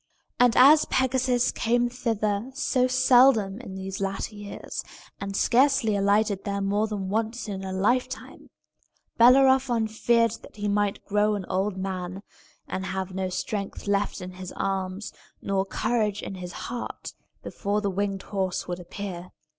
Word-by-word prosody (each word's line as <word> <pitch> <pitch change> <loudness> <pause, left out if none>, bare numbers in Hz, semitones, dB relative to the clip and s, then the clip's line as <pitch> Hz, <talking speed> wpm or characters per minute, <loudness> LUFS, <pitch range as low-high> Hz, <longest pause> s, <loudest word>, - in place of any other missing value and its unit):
And 245 -2 +4
as 290 +4 +7
Pegasus 255 -1 +1
came 240 +1 +1
thither 225 -2 -1
so 255 -3 +1
seldom 250 -5 +4
in 195 -7 -8
these 190 0 -5
latter 195 +2 -3
years, 205 -1 -7 0.4
and 200 0 -4
scarcely 260 -3 +3
alighted 200 0 +2
there 200 -1 -2
more 200 +2 +1
than 205 -3 -4
once 225 +3 -2
in 195 -2 -5
a 190 - -4
lifetime, 215 +7 -1 0.7
Bellerophon 255 -1 +5
feared 230 +1 +2
that - - -15
he 205 0 -3
might 205 -1 0
grow 210 +1 +2
an 195 -3 -4
old 190 +1 -1
man, 185 0 -4 0.4
and 190 0 -4
have 190 -1 -4
no 190 0 -2
strength 200 +2 -4
left 200 -1 0
in 180 0 -6
his 185 0 -8
arms 195 +1 -3 0.3
nor 195 0 -1
courage 215 -1 -1
in - - -5
his 180 -2 -7
heart, 240 +4 -6 0.3
before 205 +1 -2
the 200 -2 -1
winged 195 0 -2
horse 190 -3 -2
would 180 0 -4
appear. 180 0 -7
205 Hz, 150 wpm, -26 LUFS, 195-235 Hz, 0.7 s, as